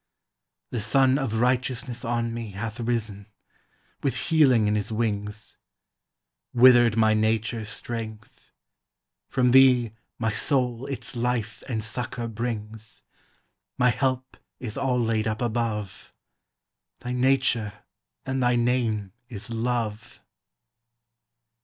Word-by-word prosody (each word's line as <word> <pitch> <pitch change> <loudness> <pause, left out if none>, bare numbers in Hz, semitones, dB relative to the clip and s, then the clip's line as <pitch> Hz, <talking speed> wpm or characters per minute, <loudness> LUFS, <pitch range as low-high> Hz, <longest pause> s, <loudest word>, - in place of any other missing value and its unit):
The 120 - -2
Sun 130 +5 +3
of 115 -5 -1
Righteousness 125 0 0
on 115 -1 -1
me 115 -3 -6
Hath 110 +4 -5
risen, 110 -4 -2 0.7
with 140 - 0
healing 135 -9 +4
in 105 - +2
his 105 +1 -2
wings; 105 -2 -3 1.0
Withered 120 -2 +7
my 110 -1 +4
nature's 110 0 0
strength; 110 -1 -7 0.8
from 125 -1 +2
thee 125 -3 +6 0.3
My 110 -1 0
soul 125 +1 0
its 135 -1 -6
life 120 -2 -2
and 110 -3 -2
succor 120 +1 -4
brings; 110 -1 -5 0.7
My 125 0 +4
help 130 +1 -2 0.2
is 115 -4 -5
all 135 -2 0
laid 110 -2 0
up 110 0 -2
above; 110 -4 -3 0.9
Thy 125 - -5
nature 125 -4 +2 0.5
and 130 0 -1
thy 120 0 +3
name 120 -5 0 0.2
is 110 0 -7
Love. 115 -1 -3
115 Hz, 110 wpm, -25 LUFS, 110-125 Hz, 1.0 s, Withered